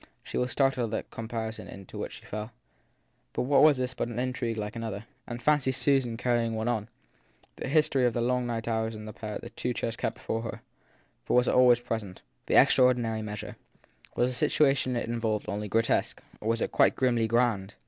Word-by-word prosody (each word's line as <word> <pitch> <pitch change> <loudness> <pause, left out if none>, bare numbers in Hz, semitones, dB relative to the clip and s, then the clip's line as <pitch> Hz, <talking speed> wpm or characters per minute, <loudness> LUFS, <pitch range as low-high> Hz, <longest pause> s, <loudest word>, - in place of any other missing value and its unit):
She - - -8
was 125 - +1
startled 135 -5 +1
at - - 0
the - - -17
comparison 115 -1 -4
into 100 -2 -11
which - - -4
she - - -12
fell 105 +2 -5 0.8
but - - -1
what 140 +2 +4
was 150 -2 +6
this 130 0 -2
but 125 - -2
an 120 -1 -6
intrigue 125 -2 -2
like 105 +1 -4
another? 115 -2 -5 0.2
And 120 0 -5
fancy 145 -2 +3
Susan 130 -3 +1
carrying 120 -2 +1
one 110 +1 -2
on! 115 -2 -1 0.7
That - - -4
history 140 -3 +3
of 120 - -1
the 120 - -1
long 125 +1 +1
night 115 -1 -3
hours 110 -1 -1
of 105 0 -8
the 110 - -7
pair 105 -2 -6
in - - -5
the 120 - -8
two 125 +2 -2
chairs 115 - -2
kept 110 - -2
before 115 - -3
her 115 - -6 0.6
for - - -2
it - - +5
was 125 - +4
always 125 -1 +5
present 110 -6 -5 0.2
the - - +1
extraordinary 120 -3 +4
measure. 105 0 -6 0.6
Was 125 +1 +2
the - - -4
situation 135 -3 +2
it 120 - -1
involved 115 -2 -1
only 105 +1 -3
grotesque 115 +3 +1 0.2
or 110 - -3
was 115 0 +1
it - - -1
quite - - +4
grimly 120 -3 +2
grand 115 - +1
115 Hz, 210 wpm, -28 LUFS, 110-125 Hz, 0.8 s, was